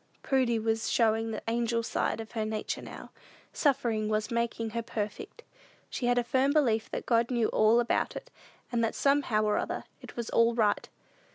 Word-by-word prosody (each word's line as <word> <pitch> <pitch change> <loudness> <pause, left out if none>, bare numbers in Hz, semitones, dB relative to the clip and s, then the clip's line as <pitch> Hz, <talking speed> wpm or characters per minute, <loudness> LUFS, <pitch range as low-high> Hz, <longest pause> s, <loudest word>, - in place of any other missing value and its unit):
Prudy 255 -4 +2
was 225 0 -1
showing 225 -1 +2
the 220 - -5
angel 230 0 0
side 225 - -1
of 220 -1 -7
her 220 -2 -2
nature 215 0 -3
now. - - -10 0.4
Suffering 235 -7 +1
was 215 +1 -1
"making 230 -1 -1
her 235 +1 -2
perfect." 220 - -5 0.5
She 245 - -2
had 245 0 +3
a 245 - +3
firm 260 +3 +2
belief 235 -8 +2
that - - -4
God 235 -1 +2
knew 235 -3 +1
all 220 +2 +4
about 240 - 0
it, - - -8 0.4
and 235 -1 +1
that 225 - 0
somehow 275 -6 +2
or 210 -1 +2
other - - -3 0.2
it - - -11
was 235 -1 -4
"all 230 0 +3
right." 215 -3 +1
230 Hz, 185 wpm, -29 LUFS, 220-240 Hz, 0.5 s, all